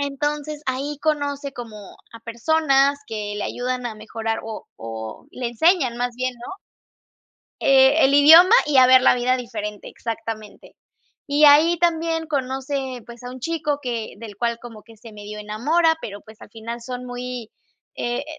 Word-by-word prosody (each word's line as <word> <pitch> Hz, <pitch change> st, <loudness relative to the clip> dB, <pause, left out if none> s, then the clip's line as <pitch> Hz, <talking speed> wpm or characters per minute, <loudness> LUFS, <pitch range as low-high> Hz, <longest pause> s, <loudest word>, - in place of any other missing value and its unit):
Entonces, 295 Hz, +1 st, -3 dB
ahí 275 Hz, +3 st, -3 dB
conoce 285 Hz, -2 st, -2 dB
como 230 Hz, -4 st, -9 dB, 0.4 s
a 230 Hz, -, -10 dB
personas 275 Hz, +4 st, +2 dB
que 210 Hz, -2 st, -5 dB
le 205 Hz, -, -3 dB
ayudan 250 Hz, 0 st, -3 dB
a 225 Hz, -, -5 dB
mejorar 225 Hz, +1 st, -4 dB
o 220 Hz, -1 st, -7 dB
o 110 Hz, -1 st, -8 dB
le 250 Hz, -2 st, -4 dB
enseñan 265 Hz, -1 st, +2 dB
más 245 Hz, 0 st, -2 dB
bien 255 Hz, 0 st, -2 dB
¿no?, 245 Hz, +11 st, -9 dB, 1.0 s
Eh, 270 Hz, +3 st, +5 dB
el 270 Hz, -, +3 dB
idioma 320 Hz, +8 st, +8 dB
y 295 Hz, -2 st, +1 dB
a 255 Hz, -1 st, +8 dB
ver 260 Hz, 0 st, +7 dB
la 255 Hz, -, +5 dB
vida 250 Hz, +1 st, +1 dB
diferente, 210 Hz, -4 st, -6 dB
exactamente. 225 Hz, -2 st, -7 dB, 0.5 s
Y 290 Hz, +1 st, +3 dB
ahí 315 Hz, +4 st, +6 dB
también 330 Hz, -1 st, 0 dB
conoce, 265 Hz, -2 st, -3 dB
pues, 235 Hz, 0 st, -12 dB
a 245 Hz, -, -6 dB
un 255 Hz, 0 st, -10 dB
chico 310 Hz, -1 st, -2 dB
que 235 Hz, -4 st, -4 dB
del 215 Hz, -3 st, -10 dB
cual 235 Hz, +1 st, -1 dB
como 230 Hz, -3 st, -11 dB
que 225 Hz, -1 st, -17 dB
se 225 Hz, 0 st, -13 dB
medio 210 Hz, 0 st, -9 dB
enamora, 300 Hz, +11 st, +1 dB
pero, 205 Hz, -1 st, -7 dB
pues, 220 Hz, 0 st, -17 dB
al -, -, -13 dB
final 230 Hz, +1 st, -7 dB
son 250 Hz, +1 st, -6 dB
muy 245 Hz, -2 st, -6 dB, 0.5 s
eh, 240 Hz, +4 st, -2 dB
250 Hz, 165 wpm, -22 LUFS, 230-285 Hz, 1.0 s, idioma